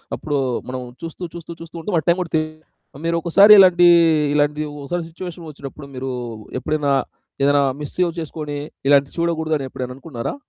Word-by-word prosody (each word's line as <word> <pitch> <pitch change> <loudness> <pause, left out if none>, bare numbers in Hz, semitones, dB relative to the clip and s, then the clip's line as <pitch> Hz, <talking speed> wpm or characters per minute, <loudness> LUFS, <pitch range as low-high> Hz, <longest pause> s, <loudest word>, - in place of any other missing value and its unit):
అప్పుడు 145 -2 -2 0.3
మనం 130 0 -4 0.2
చూస్తూ, 165 +2 -8
చూస్తూ 170 0 -8
చూస్తూ 165 0 -11
ఉంటూ 195 +5 -4
ఆ - - -3
టైం 170 +1 +4
కూడా 170 - -5
తెలిదు. 155 0 0 0.5
మీరొకసారి 170 +5 +6
ఇలాంటి, 175 -2 +7 0.5
ఇలాంటి 150 0 +1 0.2
ఒకసారి 170 +5 -3
సిట్యుయేషనొచ్చినప్పుడు, 160 -5 -9
మీరు 130 +1 -4 0.5
ఎప్పుడైనా 150 0 -1 0.5
ఏదైనా 145 0 +4 0.2
మిస్ 145 -2 -7
సేవ్ 180 -1 +2
చేసుకొని 150 -2 -5 0.3
ఇలాంటివి 140 -1 +4
చూడకూడదని 160 -4 0
ఎప్పుడైనా 125 0 -6
అనుకున్నారా? 135 - -5
155 Hz, 145 wpm, -20 LUFS, 145-170 Hz, 0.5 s, ఇలాంటి